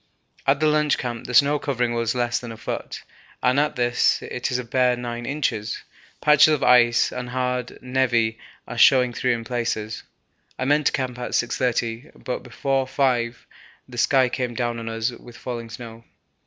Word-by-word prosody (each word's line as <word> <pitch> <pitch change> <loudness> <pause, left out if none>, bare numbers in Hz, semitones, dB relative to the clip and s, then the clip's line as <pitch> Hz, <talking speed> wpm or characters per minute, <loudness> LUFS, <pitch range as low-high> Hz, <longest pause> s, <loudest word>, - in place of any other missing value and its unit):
At 135 0 +4
the 155 - +2
lunch 150 -1 +3
camp 120 -2 -5
the 125 - -5
snow 145 +3 +5
covering 125 -4 -1
was 115 0 -1
less 120 -1 0
than 120 -2 -8
a 110 - -9
foot, - - -5 0.4
and 130 +2 +3
at 150 +1 +1
this 120 -1 +2
it 125 - -3
is 125 - 0
a 125 - -3
bare 125 +1 +2
nine 120 -1 -5
inches; 115 -7 -2 0.4
patches 150 +1 +6
of 145 - -4
ice 120 -1 +5
and 125 -1 -5
hard 125 -1 -1 0.2
névé 120 -3 +1 0.3
are - - -5
showing 125 -3 +6
through 125 0 +1
in 115 - -6
places. 115 -2 -3 0.6
I 130 - -2
meant 145 +2 +3
to - - +3
camp 130 -3 -3
at 125 - -5
6.30, 120 +1 -1
but 125 - -3
before 135 +2 -1
5.0 125 -3 +1 0.5
the 120 -1 -7
sky 130 +1 +4
came 125 -1 -3
down 120 -1 -2
on 115 0 -5
us 115 +2 -1
with 120 0 -13
falling 120 -2 -6
snow. 115 0 -9
125 Hz, 180 wpm, -23 LUFS, 120-130 Hz, 0.6 s, patches